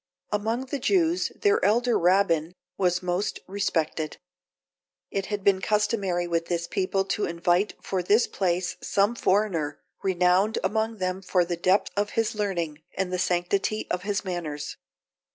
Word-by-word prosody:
Among 225 +5 -1
the 275 +2 -4
Jews, 345 +3 +2
their 415 +1 +2
elder 240 +3 +3
Rabbin 175 -2 +2 0.2
was 180 -1 +1
most 180 +3 -1
respected. 165 -5 -1 0.9
It 195 -1 -2
has 205 -1 -2
been 190 -1 +3
customary 200 -4 +1
with 170 -1 -1
this 170 -1 -1
people 195 +2 0
to 205 - -1
invite 175 +4 +1
for 190 -2 -1
this 210 +6 +4
place 180 -1 -1
some 200 +3 +2
foreigner, 185 -9 +1 0.2
renowned 185 +3 +2
among 220 +1 0
them 185 0 -2
for 180 -2 +2
the 175 0 -2
depth 185 +4 +2
of 205 0 0
his 225 -1 +2
learning, 170 -8 -2 0.2
and 185 -1 -1
the 180 - 0
sanctity 180 +4 0
of 180 - 0
his 200 +1 -2
manners. 165 -5 -4
190 Hz, 150 wpm, -26 LUFS, 175-210 Hz, 0.9 s, this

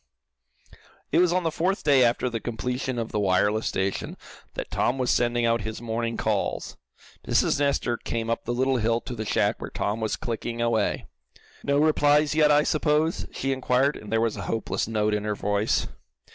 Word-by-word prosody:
It - - +4
was 180 -1 +4
on 180 +1 +1
the 165 - 0
fourth 185 +5 -1
day 140 -4 +5
after 120 +1 +2
the 115 -2 -2
completion 125 +3 -3
of 115 -1 -3
the 105 - -1
wireless 105 +3 +2
station, 95 0 -2 0.4
that - - -5
Tom 125 - +1
was 125 -1 +1
sending 120 0 +1
out 115 -1 +2
his 110 +1 -5
morning 115 0 -3
calls. - - -2 0.5
Mrs. - - +2
Nestor 140 -4 +1
came 115 0 -4
up 115 - -2
the 120 - -2
little 130 +2 +1
hill 115 0 +1
to 125 - -7
the 110 -2 -5
shack - - 0
where - - -5
Tom 105 +2 -2
was 110 - 0
clicking 115 0 -4
away. 115 -2 0 0.6
"No 140 0 +1
replies 150 0 +3
yet, 155 -1 +4
I 150 0 +5
suppose?" 155 +2 +1
she 135 - -2
inquired, 130 +2 +1
and 105 - -10
there 115 - +2
was 115 -2 0
a - - -4
hopeless 115 -2 -1
note 105 -1 0
in 105 0 -1
her 105 -1 -1
voice. 100 +1 0
120 Hz, 190 wpm, -25 LUFS, 110-140 Hz, 0.6 s, day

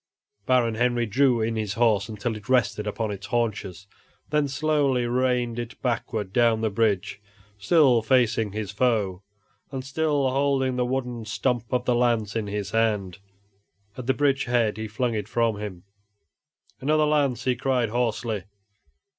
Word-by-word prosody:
Baron 125 -3 +3
Henry 120 +1 +1
drew 125 +1 +2
in 115 +1 -1
his 105 -2 -2
horse 110 -3 +2
until 110 +1 -3
it 110 +3 -11
rested 120 -4 +1
upon 110 +1 -2
its 100 0 -7
haunches, 110 -6 -2 0.5
then 150 -1 +2
slowly 140 -3 +1
reined 125 -1 0
it 120 0 -7
backward 110 -5 -2
down 115 -2 +3
the 110 -1 0
bridge, 100 -2 0 0.4
still 130 - +4
facing 115 -2 +2
his 105 0 -4
foe, 105 -5 0 0.5
and 130 -2 -5
still 145 -1 0
holding 135 -1 +1
the 125 -1 0
wooden 125 -2 -3
stump 120 +1 -2
of 125 -1 0
the 125 - +2
lance 115 -4 +1
in 110 -2 -1
his 100 0 -4
hand. 105 -5 0 0.8
At 125 -1 -7
the 130 - +2
bridge 140 -1 +1
head 120 -3 +1
he 110 0 -4
flung 120 +3 -1
it 105 -2 -3
from 115 -2 0
him. 95 -4 -7 1.0
"Another 155 +3 +2
lance!" 145 -4 +1
he 130 -1 +1
cried, 125 -2 0
hoarsely. 115 -3 -1
120 Hz, 155 wpm, -25 LUFS, 105-130 Hz, 1.0 s, still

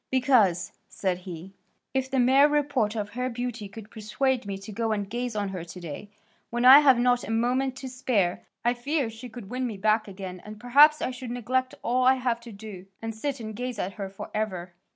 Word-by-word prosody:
"Because," 240 -9 +3 0.2
said 185 -2 -2
he, 175 +3 -8 0.4
"if 265 -1 0
the 265 - -1
mere 265 +3 +6
report 285 -7 +1
of 205 -2 -3
her 250 +2 -2
beauty 235 -3 -4
could 215 +1 -11
persuade 225 +3 -1
me 195 -1 -3
to 195 +2 -9
go 225 +2 -1
and 205 -2 -2
gaze 240 +2 -3
on 205 -1 -1
her 185 -3 -5
to 170 +2 -10
day, 175 +4 -8 0.4
when 240 +1 -1
I 265 +3 +11
have 270 -4 +6
not 245 0 +2
a - - -7
moment 250 +4 +1
to 260 +1 -7
spare, 230 -8 0 0.2
I 240 - +4
fear 265 0 -1
she 225 +3 -9
would 220 -4 -10
win 255 0 -1
me 220 -4 -5
back 215 +2 +2
again 190 -2 -8
and 210 0 -10
perhaps 290 +6 +6
I - - -1
should 250 -1 -7
neglect 255 +2 -1
all 250 +2 +1
I 260 +1 +6
have 245 -2 -1
to 235 0 -11
do, 200 -3 -10
and 225 0 -5
sit 270 +5 -3
and 220 -2 -6
gaze 250 0 -4
at 195 -1 -3
her 195 0 -5
for 195 - -9
ever." 185 -5 -3
230 Hz, 220 wpm, -27 LUFS, 205-255 Hz, 0.4 s, I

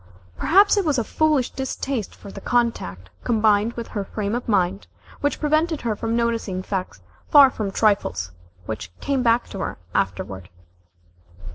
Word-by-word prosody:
Perhaps 400 +5 +4
it 405 - +3
was 300 -5 +1
a 235 - +1
foolish 300 -1 +1
distaste 265 -4 -3
for 200 - -11
the 195 - -9
contact, 95 - -1
combined 215 -1 +2
with 235 -1 -6
her 205 - -3
frame 205 +1 -3
of 240 0 -3
mind, 195 -1 +1 0.3
which 290 - -1
prevented 310 +1 +1
her 225 -3 -1
from 225 +2 -2
noticing 230 -5 -1
facts 185 - -4 0.3
far 280 -3 +8
from 210 -4 -3
trifles, 195 - +1 0.3
which 110 -2 -5
came 275 -2 0
back 235 0 +2
to 195 - -7
her - - -3 0.2
afterward. 95 -1 -2
225 Hz, 155 wpm, -23 LUFS, 195-265 Hz, 0.3 s, far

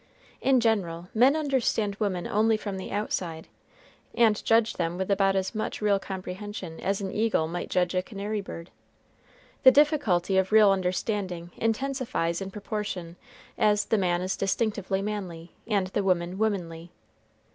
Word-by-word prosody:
In 265 -1 +4
general, 185 -7 0
men 255 +6 +5
understand 260 -8 0
women 190 -5 -1
only 220 +1 +2
from 205 -2 -5
the 190 - -6
outside, 180 -5 -3 0.7
and 220 -3 +3
judge 225 0 +3
them 170 0 -2
with 190 +1 -2
about 195 0 +3
as 190 +2 -1
much 220 -1 -3
real 205 -2 +2
comprehension 190 -2 -6
as 195 +1 -1
an 190 -1 -3
eagle 215 -7 +1
might 175 +2 -5
judge 180 -1 +1
a 185 - +1
canary 205 +2 -4
bird. 170 -3 -9 0.9
The 260 - +9
difficulty 260 - +3
of 190 +1 -1
real 215 -2 +7
understanding 185 -2 -2
intensifies 225 -7 -1
in 195 - -4
proportion 200 -4 -5 0.4
as 210 -1 +3
the 220 - +1
man 175 -1 +1
is 185 - -1
distinctively 195 -1 -1
manly, 185 -5 -5 0.2
and 205 -4 +1
the 205 - -1
woman 180 0 0
womanly. 175 -6 -2
195 Hz, 150 wpm, -27 LUFS, 180-215 Hz, 0.9 s, The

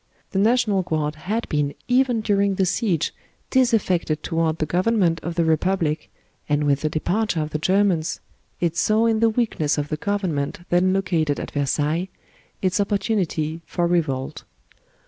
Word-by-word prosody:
The 190 - 0
National 215 -2 +3
Guard 155 -4 -1
had 205 +9 -3
been 145 -1 -1
even 250 -2 +2
during 200 -2 +1
the 190 - +2
siege 180 -4 0 0.4
disaffected 190 - +2
toward 165 -1 0
the 155 - 0
Government 180 0 +1
of 170 0 -4
the 170 -1 +2
Repub 170 +4 +1
lic, 150 0 -2 0.4
and 150 0 +2
with 140 -1 +2
the 155 - 0
departure 180 +5 0
of 155 0 -3
the 155 - -2
Germans, 185 -2 +1 0.4
it 170 -2 0
saw 215 +4 +2
in 225 -1 +2
the 230 0 +4
weakness 215 -11 0
of 145 0 -2
the 155 - -2
Government 185 -3 -2
then 180 +1 +3
located 175 -6 0
at - - -6
Versailles 150 +5 0 0.5
its 185 +2 +2
opportunity 185 -6 -1
for 175 - -1
revolt. 155 -7 -1
175 Hz, 160 wpm, -23 LUFS, 155-205 Hz, 0.5 s, the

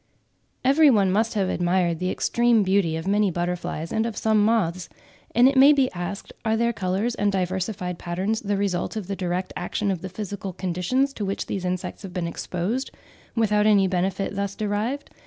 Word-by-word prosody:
Every 290 +3 +6
one 200 -7 +3
must 220 +3 +1
have 195 -3 +1
admired 175 -2 +1
the 185 - -1
extreme 235 +2 +2
beauty 190 -4 +2
of 160 - -6
many 205 0 +3
butterflies 175 -2 -3
and 220 +1 0
of 225 - -6
some 220 -1 +3
moths; 185 -6 +1 0.5
and 240 +2 +7
it 275 - +2
may 275 +3 +8
be 270 -3 +2
asked, 175 +3 -6
are 220 -1 +1
their 235 +1 +1
colours 200 +4 -1
and 205 -2 +1
diversified 185 -1 -2
patterns 190 +6 -2
the 205 -1 -1
result 195 -2 -1
of 215 -3 -4
the 195 +2 -4
direct 180 0 -3
action 195 +3 -2
of 180 -3 -3
the 190 - -5
physical 195 0 -6
conditions 185 +10 0
to 215 - -5
which 195 0 -2
these 190 -2 -4
insects 180 0 -3
have 195 -3 -8
been 175 -1 -2
exposed, 185 +9 -3 0.5
without 210 -2 +2
any 200 -3 +5
benefit 185 +1 -1
being 200 - -8
thus 200 0 -2
derived? 215 +7 -2
195 Hz, 195 wpm, -24 LUFS, 180-220 Hz, 0.5 s, may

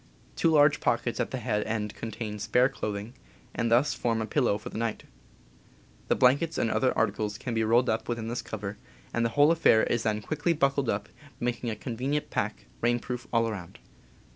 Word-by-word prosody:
Two 165 - +2
large 150 -1 +5
pockets 120 +1 0
at 120 - 0
the 130 - -3
head 110 -4 -1
end 105 -2 -2
contain 110 -1 -5
spare 125 +5 +3
clothing, 105 -3 -5 0.4
and 115 - 0
thus 125 +6 +4
form 115 -2 -1
a 110 - -1
pillow 120 -4 +1
for 105 - -8
the - - -7
night. 115 -2 -2 1.0
The - - +3
blankets, 145 +6 +3
and 115 - +1
other 130 - +2
articles, 105 -1 0
can 125 - -4
be 115 0 +1
rolled 120 +3 +3
up 110 +2 -1
within 115 -2 -2
this 120 +1 -2
cover, 105 -1 -6 0.3
and 120 - +1
the 115 - +2
whole 145 +2 +7
affair 160 -9 +5
is 120 - +1
then 105 -1 -1
quickly 155 +5 0
buckled 140 -3 +1
up, 100 - -1 0.3
making 120 0 -2
a 110 - -2
convenient 130 +6 -3
pack, - - -2 0.2
rain 120 +1 +3
proof 125 +1 -6
all 115 -1 +2
around. 95 -6 -6
115 Hz, 195 wpm, -28 LUFS, 110-130 Hz, 1.0 s, whole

